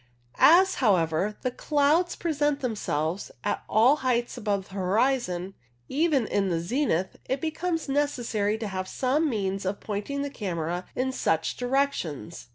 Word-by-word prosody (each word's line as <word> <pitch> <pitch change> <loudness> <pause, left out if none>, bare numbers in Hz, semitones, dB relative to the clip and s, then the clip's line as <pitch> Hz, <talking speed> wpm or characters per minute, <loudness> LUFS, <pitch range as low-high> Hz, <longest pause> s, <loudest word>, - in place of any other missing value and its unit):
As, 375 +4 +7
however, 190 -2 +2
the 255 - 0
clouds 300 +6 +2
present 295 -3 0
themselves 190 - -2
at 205 - -1
all 245 +7 +5
heights 245 -3 0
above 205 -5 -2
the - - -14
horizon, 195 -1 0 0.4
even 295 -4 +2
in 200 -2 0
the 170 -2 0
zenith, 190 - -1
it 265 - -1
becomes 325 +2 -2
necessary 240 -7 0
to 220 -1 -4
have 185 -1 -4
some 280 +9 +1
means 195 -4 -2
of 190 +1 -2
pointing 220 +7 -3
the 285 - -4
camera 175 - -3
in 260 +1 0
such 160 -10 0
direc 270 +3 +1
tions. 145 -10 -6
230 Hz, 150 wpm, -27 LUFS, 190-280 Hz, 0.4 s, As